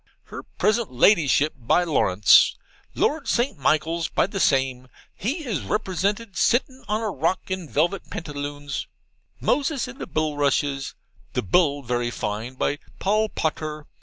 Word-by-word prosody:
Her - - -8
present 215 - 0
Ladyship, 150 - +4
by 125 +8 +2
Lawrence. 105 - +5 0.4
Lord 295 0 0
St. 245 +3 +1
Michaels, 160 +4 +1
by - - +1
the 195 +1 -5
same 130 -5 +1 0.3
he 285 - -3
is 225 -7 -2
represented 200 +1 -2
sittin' 260 +7 +1
on 215 +2 0
a 215 - -1
rock 175 +5 -1
in 185 -5 -3
velvit 170 +6 0
pantaloons. 145 -2 -5 0.5
Moses 285 -3 0
in 260 +3 -10
the - - -5
bullrushes 145 -2 0 0.4
the - - -1
bull 145 - +2
very 120 0 -1
fine, 110 +2 -4
by 145 +3 -1 0.2
Paul 215 +2 +1
Potter. 155 -3 -3
160 Hz, 135 wpm, -24 LUFS, 140-210 Hz, 0.5 s, Lawrence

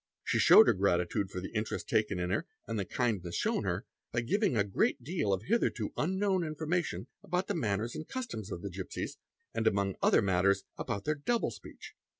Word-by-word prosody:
She - - +1
showed - - +9
her - - +5
gratitude 95 0 +1
for 90 - -5
the 95 - -7
interest 110 -1 -2
taken 105 -3 +1
in 90 0 -1
her 105 - -1 0.2
and 115 -2 -2
the 100 - -1
kindness 100 -7 -1
shown - - 0
her - - -1 0.3
by 120 - 0
giving 195 - +1
a 100 - +4
great 100 +4 0
deal 145 - -1
of 95 +1 0
hitherto 140 - 0
unknown 190 +2 +1
information 160 +2 -2 0.2
about 180 +2 -1
the 205 - -2
manners 115 - -1
and 155 - -6
customs 235 - -5
of 85 - -5
the 100 - -4
gipsies, 95 +1 -5 0.3
and 115 0 0
among 100 -2 +1
other - - +4
matters 95 +1 +3
about 100 -3 -4
their 155 - +2
double 225 +11 0
speech. - - -11
110 Hz, 195 wpm, -31 LUFS, 100-160 Hz, 0.3 s, showed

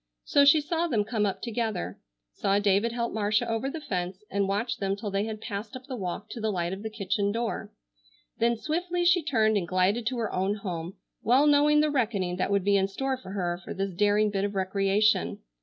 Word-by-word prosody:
So 285 - +4
she 300 +2 +7
saw 330 +3 -1
them 225 -9 +1
come 215 -1 0
up 195 - -4
together, 220 - -3 0.3
saw 195 - +1
David 205 +3 +2
help 235 0 -2
Marcia 210 0 +1
over 225 +4 -1
the 320 - -5
fence 185 -8 -4
and 200 -1 +1
watched 205 +5 -1
them 195 -1 0
till 205 0 -5
they 195 +1 0
had 220 -1 -5
passed 215 +3 -6
up 255 0 -9
the 265 -2 -5
walk 185 -6 -4
to 230 - -6
the 220 - 0
light 175 -3 -1
of 195 - -6
the 220 - -4
kitchen 205 -1 -1
door. 230 +1 -3 0.7
Then 235 0 +2
swiftly 350 +6 -1
she 350 0 +5
turned 220 -8 +2
and 180 -4 -2
glided 190 +6 +1
to 255 0 -1
her 225 -3 -2
own 190 +2 0
home, 180 -4 -5 0.3
well 255 +6 +4
knowing 300 0 +5
the 305 0 +2
reckoning 205 -9 0
that 185 - 0
would 200 -1 +2
be 200 +1 +3
in 195 0 +2
store 265 +7 -2
for 195 -7 -10
her 175 -2 -2
for - - -6
this 195 0 -2
daring 205 +3 +2
bit 195 -1 -1
of 200 0 -2
recreation. 195 +2 +2
210 Hz, 225 wpm, -27 LUFS, 195-240 Hz, 0.7 s, she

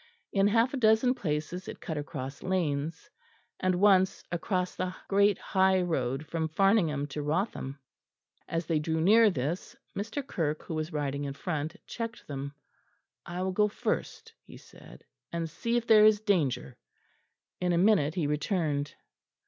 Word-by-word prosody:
In 195 0 +4
half 230 +5 +3
a - - -1
dozen 225 +1 +4
places 160 - -3
it - - -7
cut 160 - -5
across 140 -2 -5
lanes, 160 -4 -2 0.5
and 185 -1 +1
once 190 0 +4
across 180 +1 -1
the 185 0 -3
great 200 0 +4
high 190 0 +2
road 140 -5 -1
from 160 +1 -2
Farningham 170 -5 +2
to 150 +2 -4
Wrotham. 150 -3 -2 0.7
As 165 0 -2
they 160 -3 +1
drew 160 +1 -1
near 215 +6 +6
this, 155 +1 -3 0.2
Mr. 225 +7 -4
Kirke, 155 - -2
who - - -6
was 155 +1 -3
riding 145 -2 -2
in 140 - -4
front, 155 -1 -3
checked 230 0 -6
them. 140 0 -6 0.7
"I 175 +2 -3
will 190 - 0
go 210 +3 +3
first," 450 - -3
he - - -14
said, - - -15 0.3
"and 170 -1 -2
see 235 +9 -1
if 235 - -1
there 215 -2 +7
is 215 -1 +6
danger." 140 - 0 0.8
In 180 -1 +1
a 170 - +2
minute 175 -6 +3
he 170 -5 0
returned. 150 -1 -1
175 Hz, 155 wpm, -29 LUFS, 150-200 Hz, 0.8 s, there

